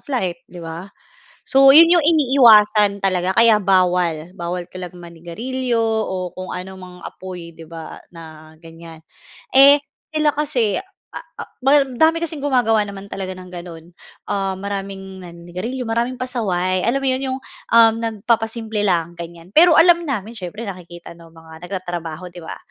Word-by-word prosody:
flight, 250 -4 -4
'di 175 - -11
ba? 165 +4 -8 0.6
So, 270 0 +7
yun 330 +2 +8
yung 345 -3 +4
iniiwasan 225 -9 +4
talaga 185 -1 0
kaya 230 -2 +5
bawal, 180 -4 +1
bawal 175 +1 -5
talaga 180 -1 -8
manigarilyo 180 +9 -4
o 215 -5 -2
kung 185 0 -7
ano 185 +1 -7
mang 180 -1 -12
apoy, 180 -3 -9
'di 165 0 -13
ba, 165 0 -9 0.2
na 155 -1 -13
ganyan. 165 0 -13 0.6
Eh, 280 +2 +8 0.3
sila 305 -1 +1
kasi, 250 -10 -1 0.3
ah 330 - -8
ah, - - -8
madami 290 +4 +2
kasing 310 -3 -5
gumagawa 245 -6 +2
naman 200 0 -9
talaga 185 -1 -5
ng 185 0 -12
gano'n. 170 -2 -9 0.5
Ah, 195 -1 -1
maraming 195 -1 -6
naninigarilyo, 180 +9 -7
maraming 235 +3 -2
pasaway. 185 -8 -1
Alam 275 +3 0
mo - - 0
yun, 260 - -3
yung 265 - -8 0.4
uhm, 225 -1 +6
nagpapasimple 225 0 -2
lang, 170 -2 0
ganyan. 170 +1 -11
Pero 335 0 +6
alam 345 +1 +6
namin 225 -5 -3
siyempre 205 +1 -7
nakikita 175 -3 -10
ng 170 0 -16
mga 160 0 -15
nagtatrabaho 175 -2 -6
'di 175 - -11
ba? 160 - -8
195 Hz, 150 wpm, -19 LUFS, 175-245 Hz, 0.6 s, yun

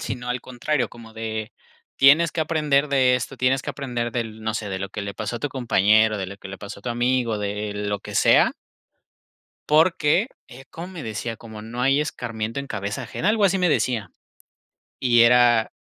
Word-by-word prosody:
sino 125 0 -5
al 125 0 -1
contrario, 130 +3 -2
como 115 -1 -13
de: 110 -1 -5 0.5
"Tienes 150 +4 +6
que 165 - -3
aprender 150 -3 +1
de 130 -2 +4
esto, 125 +2 -5
tienes 130 +1 +2
que - - -4
aprender 120 -4 -4
del 110 -2 -4
no 110 0 -2
sé, 110 -2 -3
de 95 -1 -3
lo 95 0 -4
que 105 +1 -6
le 100 -1 -5
pasó 110 +2 -4
a - - -6
tu 145 - -1
compañero, 110 -4 +3
de 95 - -3
lo 100 +1 -8
que 100 - -11
le 95 - -8
pasó 100 0 -8
a - - -29
tu 120 - -3
amigo, 120 -2 0
de 105 +1 -3
lo 105 0 -2
que - - -10
sea" - - +5 1.2
"porque", 160 - +3 0.2
eh, 130 +2 -13
¿cómo 170 +2 -7
me 180 -5 -8
decía? 110 +1 -4
Como: 110 -2 -10
"No 115 +3 -7
hay 135 +3 +3
escarmiento 115 -3 -4
en 140 - -5
cabeza 105 +4 -4
ajena" 165 - -2
Algo 215 -1 +2
así 190 0 +2
me 180 - +3
decía. 115 - 0 0.9
Y 120 -2 +4
era 120 -1 +5
120 Hz, 205 wpm, -23 LUFS, 110-135 Hz, 1.2 s, Tienes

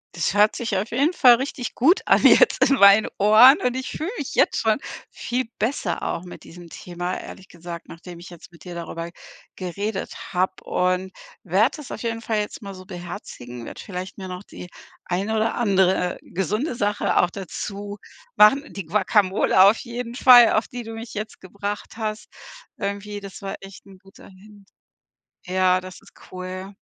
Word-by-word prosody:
Das 170 - -1
hört 210 +1 +4
sich 225 -5 -2
auf 210 +4 -2
jeden 285 +9 +1
Fall 245 -6 +7
richtig 260 0 -5
gut 325 +10 +4
an - - +3
jetzt - - +6
in 275 - +4
meinen 200 +2 +7
Ohren, 215 +7 +7
und 250 0 0
ich 260 0 -4
fühle 320 +5 -4
mich - - -5
jetzt - - +3
schon 220 +1 +2 0.3
viel 255 +1 -3
besser 215 -6 -2
auch 170 - -3
mit 175 - -11
diesem 175 0 -13
Thema, 175 +1 -5
ehrlich 190 - -11
gesagt, 170 0 -9
nachdem 170 +1 -11
ich 175 - -11
jetzt 175 0 -14
mit 170 - -17
dir 180 -1 -8
darüber 170 0 -6 0.5
geredet 190 +3 -4 0.2
habe 185 +1 -1
und 185 +1 -1 0.3
werde 195 - +2
das 295 - -10
auf - - -6
jeden 230 -1 -3
Fall 220 -1 -1
jetzt 210 - -5
mal 200 -2 -8
so 185 0 -12
beherzigen, 170 - -9
werde - - -9
vielleicht 185 0 -7
mir 190 -1 -7
noch 180 +2 -7
die 180 - -11 0.3
eine 200 +5 -2
oder 220 +1 0
andere, 190 -5 +2
äh, - - -13
gesunde 210 - -2
Sache 205 -2 0
auch 175 - +1
dazu 200 +2 -7 0.4
machen. 275 +8 +5
Die 195 -4 -6
Guacamole 190 0 +2
auf 205 +3 +6
jeden 240 0 -6
Fall, 245 -3 +7
auf 215 - +1
die 245 -1 -6
du 225 0 -8
mich 230 +2 -8
jetzt 215 +1 -6
gebracht 200 +3 -6
hast 215 -1 -4 0.5
irgendwie. 200 +1 -4
Das 195 -1 -10
war 195 - -5
echt 195 0 -13
'n 195 -1 -15
guter 195 +1 -17
Hint. 200 +1 -18 0.8
Ja, 185 0 +2
das 185 0 -11
ist - - -20 0.2
cool. 185 +2 -7
200 Hz, 185 wpm, -23 LUFS, 185-225 Hz, 0.8 s, Fall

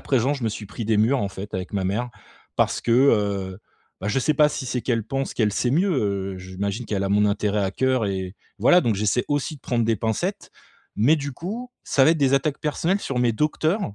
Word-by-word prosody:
présent, 135 +2 +1
je 130 - -5
me 110 - +2
suis 105 0 -6
pris 110 +2 -6
des 110 -2 +2
murs, 125 +6 +3
en 100 - -1
fait, 100 +1 -8
avec 90 +1 -4
ma 100 - 0
mère 110 +6 -1 0.5
parce - - +1
que, 115 - 0
heu, 100 -7 +2 0.4
bah, 95 - -4
je 130 +6 +1
sais 150 +4 +1
pas 150 +1 +5
si 135 -3 -5
c'est 125 -1 -2
qu'elle 115 -3 0
pense 135 +3 -3
qu'elle 105 -3 +1
sait 120 +4 0
mieux, 185 +6 +2 0.5
heu, - - -8
j'imagine 100 +5 -4
qu'elle 100 -2 -1
a - - -1
mon 105 +1 +4
intérêt 105 0 0
à 95 - -1
coeur 130 -3 +1
et 95 -1 -3 0.2
voilà, 180 +1 +5
donc 115 -3 +1
j'essaie 105 +4 +1
aussi 145 +2 -1
de - - -21
prendre 120 -2 0
des 115 -1 +1
pincettes 110 +1 -2 0.5
mais, 135 +10 +4
du 140 -1 -4
coup, 225 - -6
ça 135 - +3
va 160 - +6
être 160 - -2
des 140 -1 +3
attaques 140 +1 0
personnelles 170 +6 0
sur 130 -8 -3
mes 120 -1 +2
docteurs, 155 - 0
120 Hz, 235 wpm, -23 LUFS, 105-140 Hz, 0.5 s, va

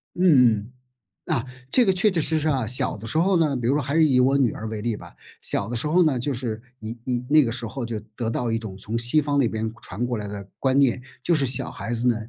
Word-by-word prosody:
嗯 180 - -1
嗯， 125 - +4 0.5
啊， 120 - -1 0.3
这 250 - +5
个 190 - +4
确 195 +3 +3
确 170 -3 0
实 160 +1 +2
实 155 - -1
啊， 130 -5 0
小 125 - 0
的 110 +2 -9
时 155 - -2
候 185 +2 +3
呢 150 -4 +1
比 120 -1 -2
如 135 - +3
说 150 - +1
还 140 +3 -3
是 160 -1 +5
以 130 -2 +3
我 135 +2 +4
女 125 -5 +2
儿 110 - -6
为 110 -1 -5
例 115 -1 -1
吧， - - -12 0.3
小 - - 0
的 120 - -4
时 115 - -1
候 175 +3 +4
呢， 135 -6 +1
就 140 +4 -2
是 115 -3 -4 0.2
你 110 +2 -7
你 125 -1 -2
那 155 -1 +6
个 115 - -2
时 120 0 -2
候 125 +1 -5
就 115 -2 -4
得 110 +2 -5
到 115 0 -2
一 115 - 0
种 100 -4 -8
从 110 +3 -4
西 120 +6 +3
方 145 -1 0
那 125 - +3
边 110 0 -3
传 105 +7 -4
过 120 -2 -2
来 105 -1 -5
的 100 -1 -7
观 135 0 +1
念， 130 -3 +3 0.2
就 170 - +2
是 145 -4 +2
小 125 0 0
孩 115 - -6
子 120 +2 +3
呢， 120 - +3
125 Hz, 305 characters per minute, -24 LUFS, 115-145 Hz, 0.5 s, 那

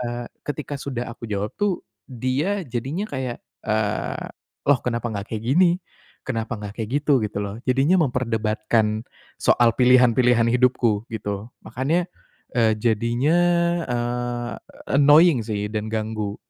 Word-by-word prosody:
eee, 120 0 -3 0.2
ketika 145 -1 -5
sudah 125 -4 -4
aku 115 -1 -9
jawab 105 0 -2
tuh, 205 -3 0 0.2
dia 135 - -1
jadinya 135 - -3
kayak, 130 - -5 0.2
eee, - - -1 0.4
"Loh, 140 -3 +4
kenapa 120 -1 -2
enggak 100 0 -5
kayak 110 -1 -5
gini? 170 +8 +4 0.5
Kenapa 115 -2 -3
enggak 105 +2 -7
kayak 110 0 -4
gitu?" 140 -4 +4
Gitu 105 -1 -4
loh. 100 +3 -6
Jadinya 140 +8 +3
memperdebatkan 110 -2 0 0.3
soal 120 -2 +3
pilihan-pilihan 125 -2 +5
hidupku 120 -3 +2
gitu. 105 +1 -4
Makanya, 160 +8 -1 0.5
eee, 115 -2 +4
jadinya, 120 +8 +2 0.5
eee, 120 -1 -2 0.5
annoying 145 -2 +6
sih 105 -1 -2
dan 110 0 -4
ganggu. 110 -2 -2
120 Hz, 125 wpm, -23 LUFS, 110-130 Hz, 0.5 s, annoying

